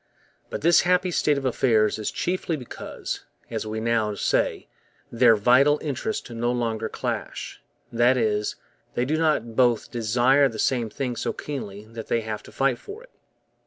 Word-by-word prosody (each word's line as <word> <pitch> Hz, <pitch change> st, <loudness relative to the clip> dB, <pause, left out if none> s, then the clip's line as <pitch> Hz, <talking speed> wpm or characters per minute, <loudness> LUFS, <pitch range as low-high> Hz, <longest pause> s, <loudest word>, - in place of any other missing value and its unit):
But -, -, -5 dB
this 170 Hz, +2 st, +5 dB
happy 180 Hz, +1 st, +2 dB
state 150 Hz, -3 st, +2 dB
of 135 Hz, -, -3 dB
affairs 110 Hz, -4 st, +2 dB
is 110 Hz, -, -2 dB
chiefly 180 Hz, -2 st, -2 dB
because, 125 Hz, -4 st, -6 dB, 0.3 s
as -, -, -3 dB
we 110 Hz, +1 st, -3 dB
now 110 Hz, -2 st, 0 dB
say, -, -, 0 dB, 0.4 s
their 115 Hz, -1 st, +5 dB
'vital 125 Hz, +7 st, +4 dB
interests 150 Hz, -, -3 dB
no 120 Hz, +1 st, -1 dB
longer 115 Hz, -2 st, -2 dB
clash'; -, -, -5 dB, 0.3 s
that 120 Hz, +2 st, +3 dB
is, 105 Hz, -3 st, 0 dB, 0.4 s
they 120 Hz, -, +1 dB
do 150 Hz, +4 st, 0 dB
not 155 Hz, -8 st, +1 dB
both 120 Hz, -2 st, +2 dB
desire 125 Hz, +4 st, +3 dB
the 110 Hz, -, -8 dB
same 120 Hz, -1 st, +1 dB
thing 125 Hz, +1 st, -3 dB
so -, -, -2 dB
keenly 105 Hz, -8 st, -6 dB
that 115 Hz, 0 st, -9 dB
they 115 Hz, -, +1 dB
have 110 Hz, -1 st, -5 dB
to -, -, -14 dB
fight 135 Hz, -2 st, +1 dB
for 435 Hz, +4 st, -10 dB
it. -, -, -20 dB
120 Hz, 165 wpm, -25 LUFS, 110-140 Hz, 0.4 s, this